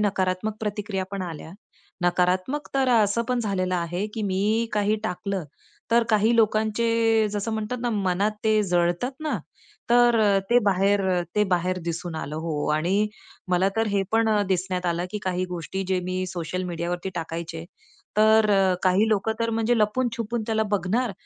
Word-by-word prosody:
नकारात्मक 195 0 0
प्रतिक्रिया 210 -2 -3
पण 200 -1 -4
आल्या. 165 -3 -7 0.5
नकारात्मक 180 +10 +1
तर 270 -1 +2
असं 225 -1 +3
पण 250 -1 +1
झालेलं 185 -4 -1
आहे, 175 +3 -2
की 220 - -3
मी 210 +4 0
काही 210 0 +1
टाकलं, 195 -2 -3 0.5
तर 235 +1 +5
काही 220 +2 +3
लोकांचे 225 0 +2
जसं 210 +2 -2
म्हणतात 220 +3 -3
ना, 240 - 0
मनात 200 -1 +1
ते 215 -1 +3
जळतात 175 +4 +1
ना, 310 0 -1 0.5
तर 240 -1 +5
अ, 200 -2 +4
ते 240 - +6
बाहेर 200 0 +2
अ, 180 - +1 0.2
ते 210 - +4
बाहेर 180 +1 +1
दिसून 170 0 -4
आलं 150 -1 -5
हो 150 -3 -2
आणि 185 +7 +1 0.4
मला 180 +1 +3
तर 225 0 +2
हे 200 - +2
पण 225 0 +3
अ, 210 -1 +3
दिसण्यात 185 -1 -1
आलं 170 0 0
की 210 - -3
काही 185 -1 0
गोष्टी 175 +3 -4
जे 185 -1 +1
मी 185 +1 -2
सोशल 175 0 -4
मीडियावरती 175 +1 -3
टाकायचे. 165 -1 -5 0.5
तर 215 0 +5
अ, 195 -2 +4
काही 190 +4 +3
लोकं 215 0 +1
तर 230 - +1
अ, - - -1
म्हणजे 225 +1 +1
लपून 220 +4 +1
छपून 230 0 -2
त्याला 220 -1 +1
बघणार 210 +5 -1
200 Hz, 170 wpm, -25 LUFS, 180-220 Hz, 0.5 s, ते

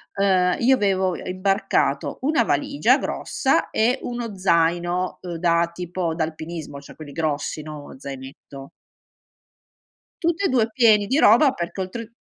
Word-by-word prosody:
ehm, 185 -2 +2
io 260 +3 +4
avevo, 190 -4 +1
uhm, - - -7
imbarcato 195 +2 0
1 305 +4 +2
valigia - - +2
grossa, - - -1
e 245 +4 +1
1 235 -4 -5
zaino, 175 0 +1
uhm, 175 -1 -5
da 170 0 +1
tipo, 175 -1 -3
da 160 - 0
alpinismo, 155 -2 -6
cioè 140 - -14
quelli 150 -2 -10
grossi, 155 0 -2
no 150 -2 -9
zainetto. 135 0 -10 1.5
Tutt'e 340 +4 +1
2 235 -3 +2
pieni 215 -4 +4
di 265 - +1
roba, 265 +1 +6
perché 180 -4 -5
oltre 230 +5 -6
180 Hz, 135 wpm, -22 LUFS, 165-220 Hz, 1.5 s, roba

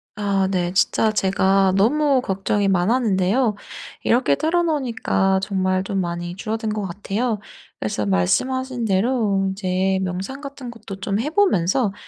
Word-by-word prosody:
아 200 -2 0
네. 180 -1 -1
진짜 215 +3 +2
제가 190 -1 +2
너무 275 +5 +3
걱정이 195 -1 -1
많았는데요 205 +3 +2 0.5
이렇게 235 - +3
털어 345 - +1
놓으니까 240 - 0
정말 185 -1 0
좀 195 0 -2
많이 175 0 -4
줄어든 220 +2 -3
것 215 - -3
같아요. 205 +4 -2 0.4
그래서 105 -1 -2
말씀하신 250 - 0
대로 205 -1 +1
이제 190 0 0
명상 190 +9 -4
같은 275 -4 -8
것도 210 -4 -9
좀 200 +2 -1
해 265 +7 -1
보면서 235 - +2
200 Hz, 295 characters per minute, -21 LUFS, 190-245 Hz, 0.5 s, 너무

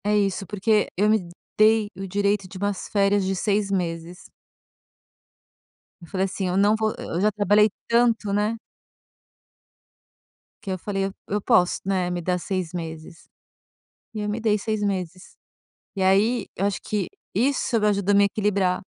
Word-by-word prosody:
É 210 +1 +2
isso, 195 -1 0
porque 210 +1 +1
eu 205 +3 +3
me 210 -5 +1 0.3
dei 215 0 +4
o 195 +1 -6
direito 200 0 0
de 185 - -10
umas 200 0 -2
férias 200 -1 +2
de 190 +1 -1
6 205 +1 0
meses. 175 -2 -4 1.7
Eu 170 - -12
falei 190 +2 -1
assim: 190 0 -3
"Eu 180 +1 0
não 205 +2 +4
vou, 220 0 0
eu 170 - -3
já 210 +1 +3
trabalhei 210 +1 +4 0.2
tanto, 230 -3 +2
né". 210 +3 0 2.1
Que 195 - -4
eu 185 - -2
falei: 195 +1 -2 0.2
"Eu 205 +1 -1
posso, 180 -2 +3
né, 185 -2 0
me 175 0 -2
dar 180 +1 0
6 185 -2 -3
meses", 165 -2 -8 0.9
e 215 - -5
eu 210 - -2
me 210 +2 -2
dei 215 -2 +2
6 215 +1 -2
meses, 185 -2 -4 0.6
e 190 - -1
aí, 205 +4 +3
eu 195 - -1
acho 200 - -2
que 205 -4 -2 0.3
isso 235 0 +1
ajudou 200 -1 +2
a - - +4
me 200 0 +6
equilibrar, 200 -3 0
200 Hz, 160 wpm, -24 LUFS, 185-210 Hz, 2.1 s, me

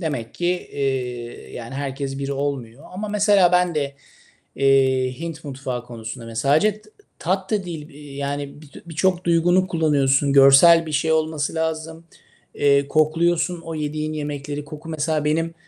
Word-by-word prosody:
Demek 140 -9 -4
ki, 175 - -2
eee, 130 -8 -3
yani 120 +1 -7
herkes 135 0 -4
bir 140 0 -3
olmuyor 140 -2 -4
ama 205 +4 -5
mesela 205 -3 +4
ben 180 -1 +3
de, 140 -2 -2 0.6
eee, 130 -1 +3
Hint 165 -1 -6
mutfağı 130 -3 -5
konusunda 115 0 -8
mesela 115 +4 0
sadece 210 +6 +2
tı 215 - -21 0.3
tat 190 +3 -2
da 210 -3 0
değil, 160 -4 -7
eee, 145 -2 -12
yani, 140 +1 -4
bitü 145 -2 -14
birçok 180 +2 0
duygunu 175 +2 +3
kullanıyorsun. 145 -5 +2
Görsel 140 +5 +7
bir 155 - -5
şey 155 +2 +1
olması 155 -2 0
lazım. 160 0 -3 0.5
Eee, 140 -1 +3
kokluyorsun 165 +3 +1
o 165 -1 -7
yediğin 155 0 -3
yemekleri. 145 -1 -5
Koku 150 +2 -10
mesela 155 -1 -1
benim 165 +2 0
150 Hz, 155 wpm, -22 LUFS, 140-165 Hz, 0.6 s, Görsel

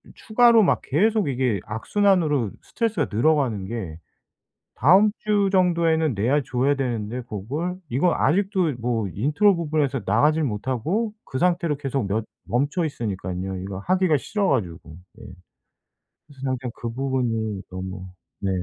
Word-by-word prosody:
추가로 230 0 +4
막 - - +2
계속 210 +7 +1
이게 125 -5 0
악순환으로 150 - +1
스트레스가 220 - -1
늘어가는 120 -6 +2
게 95 -9 -5 0.8
다음 190 - +5
주 205 -2 +2
정도에는 170 -5 +2
내야 125 +8 +1
줘야 135 +2 +1
되는데 120 -3 -3
그걸 130 - -4
이거 145 +9 +2
아직도 185 -3 +1
뭐 115 -3 -1
intro 150 - +2
부분에서 150 -5 -1
나가질 150 +11 +3
못하고 130 - -1
그 130 - -5
상태로 170 -3 +1
계속 135 -6 -2
몇 110 +3 -1 0.2
멈춰 145 +8 0
있으니깐요. 95 - -4
이거 95 0 -6
하기가 180 - +2
싫어가지고. 115 - -2 0.2
예. - - -11 1.1
그래서 140 -3 -16
항상 130 -1 -2
그 120 - -5
부분이 115 -6 -1
너무 95 0 -6 0.4
네. 100 - 0
135 Hz, 310 characters per minute, -23 LUFS, 110-175 Hz, 1.1 s, 다음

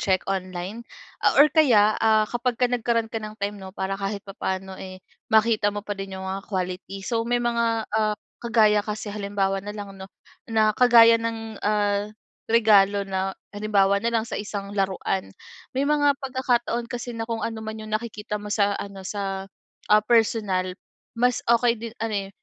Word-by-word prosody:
check 190 -2 +1
online 185 +2 -4 0.4
a - - +3
or 295 +1 +7
kaya, 230 -10 +5
ah, 220 -1 +4
kapagka 240 +2 -1
nagkaroon 230 -2 0
ka 225 - -2
ng 215 0 -8
time 200 0 -4
'no 190 - -8
para 190 0 -2
kahit 200 0 -3
papano, 190 -1 -5
eh, 185 0 -9 0.2
makita 220 -1 +3
mo 205 0 -4
pa 205 - -3
din 195 -1 -6
yung 190 - -7
mga 190 +1 -3
quality. 185 0 -4
So 230 +3 0
may 245 - +2
mga, 235 -2 0
ah, 215 -1 +1 0.2
kagaya 220 -3 +4
kasi 210 0 -5
halimbawa 200 -1 -1
na 205 +2 -7
lang 205 -1 -7
'no 190 0 -10 0.4
na 220 -1 +3
kagaya 230 -1 +6
ng, 225 -1 -5
ah, 205 -1 +1 0.4
regalo 205 -3 +4
na 190 0 -1 0.2
halimbawa 200 -1 +2
nalang 230 -1 0
sa - - -6
isang 200 -1 -5
laruan 190 -1 -1 0.4
may 275 +1 -1
mga 290 -1 +3
pagkakataon 250 -3 0
kasi 245 0 -5
na 225 - -4
kung 225 0 -3
ano 225 -1 -6
man 220 0 -6
yung 215 0 -5
nakikita 210 -2 -4
mo 210 - -7
sa 205 -1 +2
ano 195 -2 -7
sa, 195 -1 -3 0.4
ah, 210 0 +5
personal 210 -5 +1 0.4
mas 245 +1 +2
okey 235 0 +3
din 230 0 -7
ano, 225 -1 -2
eh, - - -11
215 Hz, 175 wpm, -24 LUFS, 195-230 Hz, 0.4 s, or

